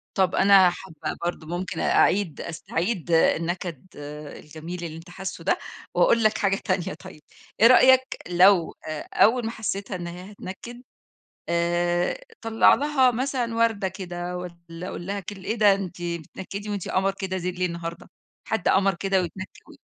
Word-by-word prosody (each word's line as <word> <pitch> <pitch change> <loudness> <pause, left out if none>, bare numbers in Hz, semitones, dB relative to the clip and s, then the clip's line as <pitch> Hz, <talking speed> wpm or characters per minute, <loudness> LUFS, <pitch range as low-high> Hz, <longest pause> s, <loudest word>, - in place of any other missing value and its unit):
طَب 190 -1 +2
أنا 195 -2 +6
حابة 175 -3 -6
برضو 175 -2 -3
ممكن 175 +1 -4
أعيد 190 -5 +2
أستعيد 170 +2 -3
النكد 170 0 +1 0.5
الجميل 165 +3 -8
اللي 160 -1 -6
أنت 165 +2 -12
حاسه 190 +2 -7
ده، - - +2 0.4
وأقول 230 -1 +4
لك 215 0 +3
حاجة 195 -2 +2
تانية 185 -2 -1
طيب 185 -5 -12 0.4
إيه 225 - +8
رأيك 260 +1 +5
لو 180 -1 +5
آآ، 155 -1 -5
أول 235 +2 +4
ما 225 - -2
حسيتها 200 -3 -4
إن 175 -1 -5
هي 180 +3 -9
هتنكد 210 +5 -9 0.7
آآ، 175 +1 +1 0.2
طلع 225 -1 +5
لها 275 -3 +3
مثلًا 245 -1 -2
وردة 225 -4 +2
كده 180 -1 -5
والّا 170 0 -8
قل 175 - -7
لها 200 +2 -3
كل 195 0 -9
إيه 220 - -1
ده 210 -3 +5
أنتِ 185 -3 -5
بتنكدي 175 +4 -6
وأنتِ 200 -3 -4
قمر 195 +1 +1
كده 190 -1 -2
زيل 180 0 -4
ليه 180 - +2
النهارده؟ 170 -1 -6 0.4
حد 220 -4 -1
قمر 195 -1 +3
كده 195 +1 +1
ويتنكد 185 +2 -5 0.2
و - - -14
185 Hz, 160 wpm, -25 LUFS, 175-205 Hz, 0.7 s, إيه